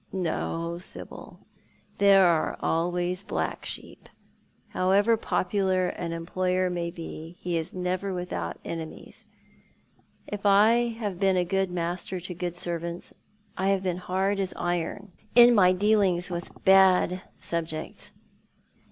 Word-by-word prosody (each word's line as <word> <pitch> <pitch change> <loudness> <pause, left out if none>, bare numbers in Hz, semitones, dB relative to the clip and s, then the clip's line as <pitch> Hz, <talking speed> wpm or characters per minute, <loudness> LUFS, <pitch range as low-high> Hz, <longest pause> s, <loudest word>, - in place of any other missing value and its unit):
"No, 170 -1 -2
Sibyl. 180 - -10 0.5
There 195 -1 +6
are 170 -3 +2
always 175 +2 -1
black 200 - -3
sheep. - - -7 0.6
However 200 +5 +3
popular 190 -3 0
an 170 -1 -5
employer 180 +2 -1
may 170 -1 -2
be, 165 0 -8
he 175 -1 -2
is 160 +1 -3
never 185 +2 -2
without 175 - -4
enemies. 160 -1 -7 1.0
If 205 -1 -6
I 215 +4 +5
have 205 -6 -4
been 195 -2 +3
a 180 - +2
good 195 +1 0
master 180 +1 -3
to 180 +1 -6
good 175 0 -4
servants, 170 0 -5 0.4
I 190 - -1
have 195 -1 +1
been 180 -2 -1
hard 190 +2 -1
as 195 -1 -2
iron 175 +3 -3 0.2
in 240 0 +9
my 185 -5 +6
dealings 185 -2 +2
with 175 0 -4 0.2
bad 190 -1 +5 0.2
subjects. 160 -2 -4
180 Hz, 125 wpm, -27 LUFS, 170-195 Hz, 1.0 s, in